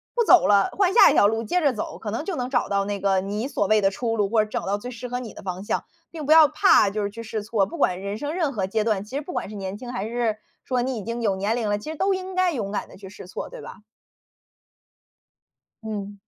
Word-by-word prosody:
不 475 - +3
走 370 -4 +6
了， 200 -1 +4
换 385 -2 +1
下 475 - +8
一 - - +1
条 205 - +5
路 225 +2 -1
接 295 +11 0
着 285 -4 +3
走， 215 - -5
可 215 - -5
能 235 +8 -3
就 385 - -3
能 250 -3 -3
找 245 -2 0
到 200 0 +1
那 205 0 -3
个 195 -1 +2
你 205 +5 -3
所 205 -7 -1
谓 215 +1 +4
的 195 0 +3
出 230 +3 -2
路， 205 -3 +1
或 220 0 +3
者 215 - -8
找 - - -3
到 200 +1 0
最 245 +4 -7
适 250 0 -7
合 245 +1 -2
你 235 -5 -8
的 - - -11
方 185 0 -5
向。 - - -2 0.3
并 315 -3 -6
不 295 - 0
要 315 -1 +9
怕 210 - +4
就 210 +1 -3
是 200 - -2
去 230 +3 -8
试 220 -1 -4
错， 210 -3 +1
不 - - -8
管 180 +1 +1
人 200 +1 -4
生 290 +5 -4
任 330 -5 0
何 205 -7 -2
阶 210 +3 -1
段， 210 -3 0
其 210 +6 -10
实 285 - -1
不 305 - -8
管 - - -3
是 210 - -9
年 195 0 -5
轻， 245 +2 -8
还 210 -3 -3
是 230 -2 -1 0.3
说 250 -2 0
你 255 0 -2
已 210 - -5
经 230 +2 -4
有 205 -4 +1
年 200 +4 -1
龄 230 -3 -1
了， 205 - +1
其 210 - -11
实 - - -6
都 385 +4 +1
应 375 0 -6
该 370 -1 +2
勇 215 -10 -3
敢 205 - -4
地 - - -14
去 190 -1 -11
试 190 -2 -11
错， - - -6
对 - - -10
吧？ 195 - -11 2.0
嗯。 205 -2 -6
220 Hz, 310 characters per minute, -24 LUFS, 200-255 Hz, 2.0 s, 要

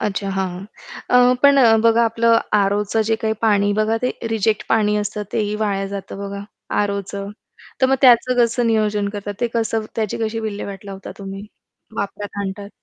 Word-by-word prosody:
अच्छा! 200 -1 -2
हां, 190 -1 -1
हां. 180 +2 -8 0.7
अ, - - +1
पण 280 0 +6
अ, 230 -4 +6
बघा 230 0 +4
आपलं 230 0 +3 0.2
aroचं 205 +2 +2
जे 225 - +3
काही 220 0 -1
पाणी 205 -2 +3
बघा 215 +2 +1
ते 250 - +1 0.2
रिजेक्ट 220 -1 0
पाणी 210 -2 +2
असतं 210 0 -2
तेही 210 -1 -1
वाया 200 -2 -1
जातं 195 0 -7
बघा. 200 0 -6 0.4
aroचं. 200 0 -4 0.5
तर 260 - +5
मग 265 +1 +2
त्याचं 255 0 +6
कसं 235 +1 +1
नियोजन 210 -2 +1
करतात, 205 0 -6
ते 240 - +2
कसं 225 -1 0
त्याची 215 -3 -2
कशी 220 +1 -2
विल्हेवाट 205 -2 -5
लावता 195 -1 -8
तुम्ही, 195 +1 -7 0.5
वापरात 205 0 -5
आणतात? 200 +1 -5
210 Hz, 175 wpm, -20 LUFS, 200-225 Hz, 0.7 s, पण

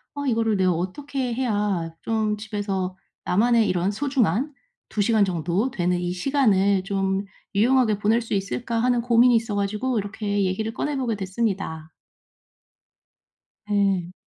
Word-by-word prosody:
'아 285 - -4
이거를 225 -3 +1
내가 185 -1 +3
어떻게 250 - -3
해야 205 -9 -1
좀 220 -2 0
집에서 200 -3 -3 0.3
나만의 230 +3 +3
이런 180 +2 +1
소중한 265 - 0 0.4
2 210 - -1
시간 220 -1 +3
정도 180 +6 -1
되는 180 -3 0
이 175 0 -2
시간을 200 -4 +2
좀 195 0 -1 0.3
유용하게 225 -1 +3
보낼 220 +3 +2
수 230 - -5
있을까?' 210 +4 -2
하는 245 -1 +2
고민이 240 +1 +5
있어 225 -2 0
가지고 210 +5 -1
이렇게 205 0 -2
얘기를 220 +4 -2
꺼내보게 260 -6 -1
됐습니다. 190 -5 -3 1.8
네. 195 -4 +1
210 Hz, 290 characters per minute, -24 LUFS, 190-235 Hz, 1.8 s, 고민이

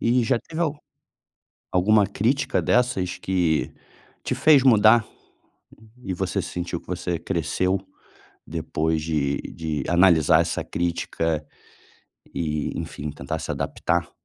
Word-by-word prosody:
E 120 +2 +2
já 120 +2 +2
teve 165 +6 -7
al 150 -2 -1 1.0
alguma 100 +3 +4
crítica 130 +7 0
dessas 120 -7 +1
que 90 -4 0 0.5
te - - -1
fez 150 -4 +5
mudar? 110 -2 +6 1.0
E 95 - -3
você - - -2
sentiu 85 -1 -4
que - - -26
você 90 -1 -3
cresceu 95 +2 -1 0.7
depois 80 0 -2
de 75 -3 0 0.2
de 80 -3 -3
analisar 85 -4 +5
essa - - -3
crítica 80 -2 -2 0.9
e, 75 -3 -2
enfim, 75 - -6
tentar 70 -2 -5
se - - -4
adaptar? 85 -1 -1
90 Hz, 120 wpm, -24 LUFS, 80-110 Hz, 1.0 s, mudar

